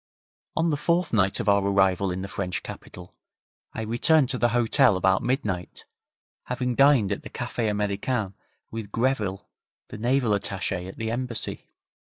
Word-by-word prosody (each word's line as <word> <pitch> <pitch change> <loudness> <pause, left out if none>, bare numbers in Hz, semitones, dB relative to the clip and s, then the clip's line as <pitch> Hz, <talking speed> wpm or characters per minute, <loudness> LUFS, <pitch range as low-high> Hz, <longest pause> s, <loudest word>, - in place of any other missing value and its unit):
On 165 0 +2
the 145 - 0
fourth 170 +2 0
night 100 -3 +2
of - - -3
our 100 -1 +4
arrival 95 -1 +2
in 90 +1 -3
the - - -4
French 90 -3 -4
capital 90 0 -10 0.6
I 110 - -5
returned 125 +5 +3
to 125 - -2
the 120 - +3
hotel 120 -1 +3
about 95 +1 +2
midnight, 105 -9 -2 0.6
having 125 0 -2
dined 135 -6 +4
at 100 - -2
the - - -9
Café 120 -2 -2
Americain 105 +1 -1 0.4
with 110 -2 -6
Greville, 115 -6 -1 0.4
the - - -8
naval 125 0 +1
attaché 95 -2 -2
at 95 - -9
the 110 0 -2
Embassy. 120 -1 -4
110 Hz, 160 wpm, -25 LUFS, 100-125 Hz, 0.6 s, our